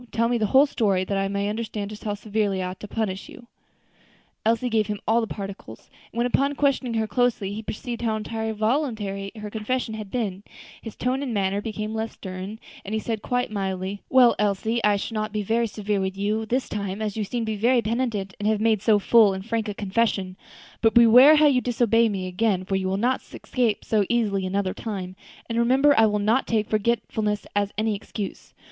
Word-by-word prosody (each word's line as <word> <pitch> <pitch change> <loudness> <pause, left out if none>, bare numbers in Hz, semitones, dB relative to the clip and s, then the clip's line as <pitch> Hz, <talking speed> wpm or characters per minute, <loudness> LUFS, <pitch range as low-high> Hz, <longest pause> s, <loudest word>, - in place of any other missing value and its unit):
tell 230 0 +1
me 240 0 0
the 215 - +1
whole 265 +6 +6
story, 200 -9 +1
that 200 +2 -2
I 195 - 0
may 200 +1 -1
understand 210 -1 -4
just 210 - -10
how 205 -1 -1
severely 205 -2 -1
I 180 - -2
ought 185 - -11
to 210 - -8
punish 200 -3 -3
you." 245 - -13 1.0
Elsie 230 +3 +1
gave 220 -3 +1
him 210 -1 -3
all 230 +2 +3
the 225 - -2
particulars; 195 - -8 0.2
and - - -11
when, 235 - +2
upon 275 +3 +1
questioning 265 -4 +1
her 220 -1 +1
closely, 225 -4 0
he 215 - -5
perceived 235 +2 -5
how 225 -2 0
entirely 220 +1 -3
voluntary 215 -4 -1
her 210 -1 -7
confession 225 +2 -2
had 215 -2 -6
been, 200 -5 -3 0.4
his 225 - -8
tone 255 +2 -1
and 255 -5 -3
manner 200 0 0
became 215 0 -4
less 220 0 -3
stern, 190 +2 -7 0.3
and 205 +3 -4
he - - 0
said 220 -1 -3
quite 245 0 -1
mildly, 195 -1 -3
"Well, 255 -2 +6
Elsie, 210 +3 0
I 210 -1 +4
shall 200 +3 -4
not 215 -1 -2
be 210 0 -2
very 230 +3 +1
severe 210 -2 -2
with 190 0 -3
you 215 +2 -1
this 255 +4 0
time, 200 -1 -4
as 215 -2 -3
you 220 - -1
seem 235 +3 -3
to 220 - -2
be - - -2
very 235 +3 +2
penitent, 215 -4 -2
and 205 - -1
have 215 -1 +2
made 220 -2 +2
so 215 -1 +4
full 205 -1 +5
and 190 0 -7
frank 230 -1 -1
a 205 - -4
confession; 200 -2 -1 0.5
but 225 -1 +3
beware 245 +6 +8
how 305 0 +5
you 270 -4 +4
disobey 230 -2 +2
me 195 -3 -3
again, 185 0 0
for 195 - -1
you 190 -1 -1
will 190 +1 0
not 245 +5 +1
escape 240 -5 -2
so 215 -2 +2
easily 205 -5 +1
another 190 0 -1
time; 190 -4 -5 0.3
and 230 0 -1
remember 265 +5 +4
I 225 0 +5
will 210 0 0
not 220 +6 +1
take 220 -2 0
forgetfulness 215 -1 0
as 205 0 +1
any 215 0 +1
excuse. 200 0 -7
215 Hz, 215 wpm, -24 LUFS, 200-235 Hz, 1.0 s, beware